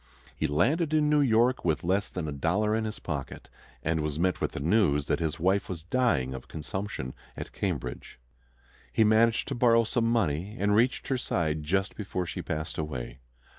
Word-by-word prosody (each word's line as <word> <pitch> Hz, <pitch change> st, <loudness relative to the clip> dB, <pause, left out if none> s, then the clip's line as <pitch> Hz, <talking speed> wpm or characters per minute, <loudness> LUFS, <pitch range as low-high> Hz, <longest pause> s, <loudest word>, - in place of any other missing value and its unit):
He 80 Hz, -, 0 dB
landed 155 Hz, -, +2 dB
in 150 Hz, -1 st, +3 dB
New 150 Hz, -1 st, +4 dB
York 125 Hz, 0 st, +3 dB
with 80 Hz, -3 st, 0 dB
less 95 Hz, +4 st, +1 dB
than 90 Hz, -4 st, -4 dB
a -, -, -3 dB
dollar 95 Hz, +10 st, +1 dB
in 110 Hz, 0 st, -1 dB
his 110 Hz, -1 st, -4 dB
pocket, 70 Hz, -5 st, -6 dB, 0.3 s
and 80 Hz, +1 st, 0 dB
was 75 Hz, -1 st, -2 dB
met 90 Hz, +2 st, 0 dB
with -, -, -1 dB
the -, -, -4 dB
news 75 Hz, -3 st, +2 dB
that -, -, 0 dB
his 80 Hz, -1 st, -2 dB
wife 95 Hz, +4 st, +1 dB
was 85 Hz, -4 st, -5 dB
dying 90 Hz, -, +1 dB
of 65 Hz, -, -8 dB
consumption 80 Hz, -4 st, -5 dB, 0.2 s
at -, -, -6 dB
Cambridge. 60 Hz, -1 st, -4 dB, 0.7 s
He 110 Hz, -, +3 dB
managed 110 Hz, +1 st, +3 dB
to -, -, -1 dB
borrow 120 Hz, -2 st, +4 dB
some 115 Hz, +1 st, 0 dB
money, 100 Hz, -2 st, 0 dB
and 105 Hz, +1 st, +2 dB
reached 120 Hz, +4 st, +2 dB
her 130 Hz, -2 st, +1 dB
side 80 Hz, -9 st, -1 dB
just 95 Hz, +6 st, -1 dB
before 95 Hz, -3 st, -3 dB
she -, -, -5 dB
passed 80 Hz, +1 st, -4 dB
away. 65 Hz, -5 st, -5 dB
95 Hz, 190 wpm, -28 LUFS, 75-115 Hz, 0.7 s, New